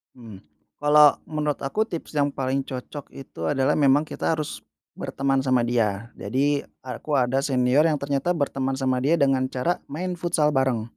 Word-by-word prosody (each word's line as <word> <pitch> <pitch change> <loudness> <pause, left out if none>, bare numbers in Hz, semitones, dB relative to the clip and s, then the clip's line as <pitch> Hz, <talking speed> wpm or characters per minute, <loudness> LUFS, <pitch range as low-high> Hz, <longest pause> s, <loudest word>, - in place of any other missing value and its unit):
Mmm. 110 -7 -12 0.4
Kalau 150 0 +7 0.2
menurut 150 -2 -2
aku 210 +11 0
tips 160 -3 -6
yang 145 0 +1
paling 135 0 -1
cocok 135 +2 -8
itu 135 - -8
adalah 135 -2 +1
memang 140 -1 +4
kita 155 +1 -2
harus 155 -2 -4 0.3
berteman 135 0 -1
sama 130 -2 +2
dia, 115 -2 -1
jadi 140 +7 0 0.2
aku 145 +3 -4
ada 130 0 +2
senior 135 +2 +3
yang 155 - +2
ternyata 140 +5 -1
berteman 135 -3 -1
sama 130 -1 0
dia 145 +6 +2
dengan 135 -4 +2
cara 130 +8 -1
main 175 +4 -4
futsal 155 -4 +1
bareng. 130 -5 +1
135 Hz, 165 wpm, -24 LUFS, 130-150 Hz, 0.4 s, Kalau